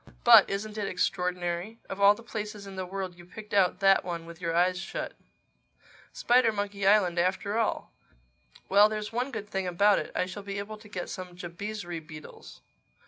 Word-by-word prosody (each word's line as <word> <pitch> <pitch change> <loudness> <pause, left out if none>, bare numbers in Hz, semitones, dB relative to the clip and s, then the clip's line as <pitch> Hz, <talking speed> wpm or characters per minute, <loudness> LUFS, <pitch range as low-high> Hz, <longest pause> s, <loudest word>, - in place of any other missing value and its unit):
But - - +8
isn't 210 +2 -4
it 205 - -2
extraordinary? 180 +2 -2
Of 195 +1 -6
all 200 +1 +7
the 230 - -13
places 210 -3 -6
in 195 -1 -9
the 185 -1 -4
world 190 -1 -4
you 175 - -14
picked 210 +4 -11
out 195 -1 +3
that 195 0 +5
one 170 -2 -5
with 170 +1 -12
your 165 -1 -1
eyes 180 +1 +2
shut. 190 - -5 1.0
Spidermonkey 205 -5 +1
Island 190 -4 +4
after 195 +4 0
all!—Well, 60 - -1
there's 215 0 -4
one 250 +3 -1
good 220 -5 -6
thing 190 -2 -3
about 200 +3 +4
it: - - -6
I - - +1
shall 185 +3 -7
be 200 0 -6
able 215 +2 -6
to 210 -1 -15
get 180 -3 -5
some 180 -1 -7
Jabizri 175 0 -6
beetles." 155 -1 -12
195 Hz, 180 wpm, -28 LUFS, 180-210 Hz, 1.0 s, But